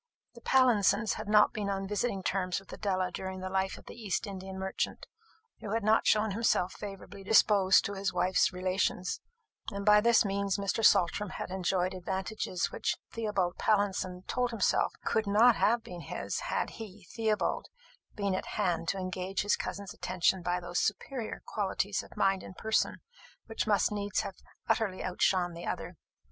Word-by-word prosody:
The 235 Hz, -, -14 dB
Pallinsons 230 Hz, -5 st, +3 dB
had 215 Hz, -, -6 dB
not 210 Hz, 0 st, +5 dB
been 205 Hz, -2 st, -2 dB
on 195 Hz, 0 st, -2 dB
visiting 205 Hz, -1 st, -1 dB
terms 185 Hz, -1 st, 0 dB
with 195 Hz, -, -14 dB
Adela 185 Hz, -3 st, -1 dB
during 190 Hz, +1 st, -5 dB
the 185 Hz, 0 st, -5 dB
life 190 Hz, 0 st, 0 dB
of -, -, -15 dB
the -, -, -9 dB
East 220 Hz, -4 st, -2 dB
Indian 190 Hz, -1 st, -7 dB
merchant, 190 Hz, 0 st, -3 dB, 0.5 s
who 210 Hz, -, -5 dB
had 225 Hz, -, -1 dB
not 215 Hz, +1 st, +3 dB
shown 215 Hz, 0 st, +3 dB
himself 195 Hz, -3 st, +1 dB
favourably 200 Hz, -1 st, -9 dB
disposed 200 Hz, -2 st, +5 dB
to 200 Hz, -, -3 dB
his 195 Hz, -1 st, -1 dB
wife's 180 Hz, +1 st, +2 dB
relations; 185 Hz, 0 st, -1 dB, 0.5 s
and 200 Hz, -1 st, -5 dB
by 210 Hz, 0 st, +7 dB
this 235 Hz, -1 st, +4 dB
means 200 Hz, 0 st, 0 dB
Mr. 200 Hz, +2 st, -1 dB
Saltram 195 Hz, +1 st, +4 dB
had 180 Hz, -, -6 dB
enjoyed 185 Hz, 0 st, 0 dB
advantages 190 Hz, 0 st, -3 dB
which -, -, -1 dB
Theobald 205 Hz, -6 st, -1 dB
Pallinson 190 Hz, -3 st, 0 dB
told 250 Hz, 0 st, 0 dB
himself 230 Hz, -5 st, +1 dB
could 220 Hz, -2 st, +1 dB
not 225 Hz, +4 st, +6 dB
have 230 Hz, +1 st, +2 dB
been 180 Hz, -7 st, -8 dB
his, -, -, -4 dB
had -, -, -1 dB
he, 205 Hz, -2 st, -9 dB
Theobald, 220 Hz, -2 st, 0 dB, 0.5 s
been 200 Hz, -2 st, -1 dB
at 185 Hz, -, -2 dB
hand 175 Hz, -5 st, 0 dB
to 195 Hz, -, 0 dB
engage 185 Hz, +1 st, -2 dB
his 205 Hz, -, +3 dB
cousin's 200 Hz, -2 st, -5 dB
attention 185 Hz, +1 st, 0 dB
by 175 Hz, +1 st, -1 dB
those 175 Hz, 0 st, -2 dB
superior 225 Hz, +3 st, -3 dB
qualities 200 Hz, -1 st, -1 dB
of -, -, -15 dB
mind 195 Hz, -1 st, +2 dB
and 185 Hz, -, -11 dB
person 220 Hz, 0 st, 0 dB, 0.4 s
which 225 Hz, -1 st, -3 dB
must 205 Hz, -1 st, +3 dB
needs 205 Hz, -1 st, -1 dB
have -, -, -5 dB, 0.3 s
utterly 210 Hz, -6 st, 0 dB
outshone 180 Hz, -1 st, +1 dB
the 170 Hz, -, -7 dB
other. -, -, -4 dB
195 Hz, 170 wpm, -30 LUFS, 185-210 Hz, 0.5 s, by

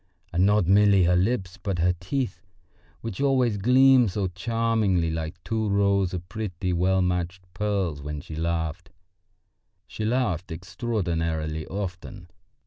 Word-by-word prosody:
And 90 Hz, +3 st, +3 dB
not 105 Hz, -2 st, +3 dB
merely 100 Hz, +1 st, +5 dB
her 90 Hz, +1 st, +3 dB
lips, 95 Hz, -1 st, 0 dB
but 95 Hz, -2 st, -2 dB
her 90 Hz, +1 st, +2 dB
teeth, 95 Hz, -2 st, -3 dB, 0.6 s
which 115 Hz, +1 st, -5 dB
always 130 Hz, -6 st, +2 dB
gleamed 125 Hz, +2 st, +5 dB
so 100 Hz, +1 st, -2 dB
charmingly 105 Hz, -3 st, 0 dB
like 80 Hz, +1 st, -4 dB
two 110 Hz, -1 st, -1 dB
rows 100 Hz, -2 st, +2 dB
of 90 Hz, -1 st, -6 dB
pretty, 90 Hz, -2 st, -3 dB
well 95 Hz, +2 st, +2 dB
matched 90 Hz, 0 st, -2 dB
pearls 95 Hz, -6 st, -1 dB
when 75 Hz, +1 st, -5 dB
she 75 Hz, -, -10 dB
laughed. 80 Hz, -1 st, -2 dB, 1.0 s
She 110 Hz, -, -6 dB
laughed 110 Hz, -8 st, -1 dB
extraordinarily 80 Hz, -5 st, -2 dB
often. 90 Hz, -1 st, -6 dB
95 Hz, 135 wpm, -25 LUFS, 85-105 Hz, 1.0 s, merely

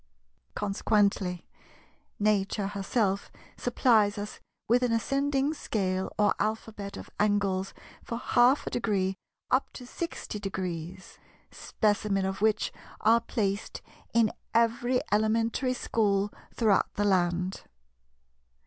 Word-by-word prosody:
Consequently, 200 Hz, -3 st, +1 dB, 0.7 s
Nature 205 Hz, -1 st, +1 dB
herself 200 Hz, 0 st, -1 dB, 0.2 s
supplies 225 Hz, -4 st, +3 dB
us 205 Hz, +1 st, -6 dB, 0.3 s
with 240 Hz, +2 st, +4 dB
an 250 Hz, -2 st, +1 dB
ascending 275 Hz, +5 st, +1 dB
scale 190 Hz, -9 st, -2 dB
or 205 Hz, -1 st, +4 dB
Alphabet 215 Hz, -2 st, -3 dB
of -, -, -10 dB
angles 200 Hz, -2 st, +1 dB, 0.3 s
for 230 Hz, -, -4 dB
half 245 Hz, +3 st, +3 dB
a -, -, -4 dB
degree 195 Hz, -5 st, 0 dB, 0.4 s
up 255 Hz, +2 st, +2 dB
to 250 Hz, -, -9 dB
60°, 190 Hz, -, -5 dB, 0.3 s
Specimen 205 Hz, -2 st, 0 dB
of 190 Hz, +1 st, -3 dB
which 215 Hz, -1 st, +2 dB, 0.3 s
are 230 Hz, +2 st, +5 dB
placed 205 Hz, -3 st, -2 dB, 0.3 s
in 230 Hz, -2 st, +3 dB, 0.2 s
every 235 Hz, +2 st, +2 dB
Elementary 225 Hz, +4 st, +1 dB
School 205 Hz, -4 st, +1 dB, 0.2 s
throughout 215 Hz, -4 st, +2 dB
the 205 Hz, -, +1 dB
land. 180 Hz, -1 st, +1 dB
210 Hz, 105 wpm, -28 LUFS, 195-230 Hz, 0.7 s, are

